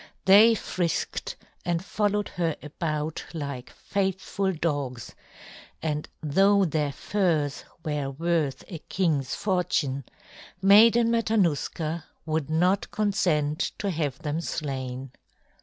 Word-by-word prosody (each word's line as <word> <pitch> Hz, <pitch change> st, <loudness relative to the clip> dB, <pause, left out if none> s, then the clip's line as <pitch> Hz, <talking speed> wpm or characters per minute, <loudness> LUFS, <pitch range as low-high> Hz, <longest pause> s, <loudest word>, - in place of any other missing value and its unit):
They 210 Hz, +4 st, +8 dB
frisked 175 Hz, -5 st, -2 dB, 0.3 s
and 175 Hz, +1 st, -1 dB
followed 205 Hz, +1 st, 0 dB
her 165 Hz, -3 st, -1 dB
about 155 Hz, 0 st, -3 dB
like 140 Hz, -5 st, -5 dB
faithful 195 Hz, 0 st, -2 dB
dogs; 145 Hz, -, -3 dB, 0.7 s
and 150 Hz, -1 st, -3 dB
though 195 Hz, +6 st, +4 dB
their 150 Hz, -3 st, 0 dB
furs 160 Hz, -5 st, 0 dB, 0.2 s
were 150 Hz, -3 st, -1 dB
worth 160 Hz, -1 st, -1 dB
a 170 Hz, -5 st, -7 dB
king's 155 Hz, -8 st, -1 dB
fortune, 155 Hz, -, 0 dB, 0.5 s
Maiden 225 Hz, +4 st, +6 dB
Matanuska 170 Hz, -7 st, 0 dB, 0.2 s
would 155 Hz, -2 st, -1 dB
not 180 Hz, +5 st, +2 dB
consent 170 Hz, -8 st, 0 dB
to 200 Hz, -2 st, -1 dB
have 150 Hz, -6 st, -2 dB
them 155 Hz, +2 st, -3 dB
slain. 130 Hz, -5 st, -4 dB
165 Hz, 105 wpm, -26 LUFS, 145-195 Hz, 0.7 s, They